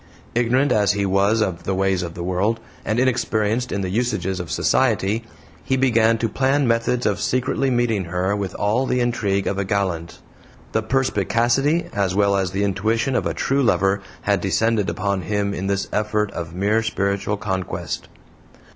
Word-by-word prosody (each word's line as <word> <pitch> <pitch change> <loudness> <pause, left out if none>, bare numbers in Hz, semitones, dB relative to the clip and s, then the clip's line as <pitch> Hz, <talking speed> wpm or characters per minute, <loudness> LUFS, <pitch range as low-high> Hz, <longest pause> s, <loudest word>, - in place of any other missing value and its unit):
Ignorant 125 +4 +2
as 105 -1 +3
he 100 -1 0
was 100 +3 +2
of 95 -5 -1
the 95 - 0
ways 95 -1 +1
of 85 -1 -5
the 85 - -5
world, 95 +6 0 0.2
and 110 +2 0
inexperienced 120 -2 0
in 100 - -1
the 95 - -2
usages 95 -5 -1
of 90 -3 -5
society, 110 - +1 0.4
he 130 - 0
began 115 -3 +3
to 115 - 0
plan 135 +4 +1
methods 115 +1 +1
of 105 -2 0
secretly 130 +2 0
meeting 120 -6 +1
her 90 +3 -1
with 100 -3 -4
all 110 +6 +1
the 125 - +1
intrigue 105 -5 0
of 100 - -1
a - - +1
gallant. 90 -4 -2 0.5
The 110 - +1
perspicacity 125 - +1
as 95 -2 0
well 100 0 +3
as 95 -2 0
the 95 +2 -1
intuition 110 +6 0
of - - +1
a - - -3
true 135 +1 +1
lover 100 -5 +2 0.2
had - - +1
descended 110 -4 +1
upon 95 +3 -1
him 100 0 -1
in 95 0 -3
this 100 0 -1
effort 105 -1 0
of 85 0 -6
mere 105 +4 +2
spiritual 100 -1 -1
conquest. 95 -3 -4
105 Hz, 175 wpm, -22 LUFS, 95-120 Hz, 0.5 s, as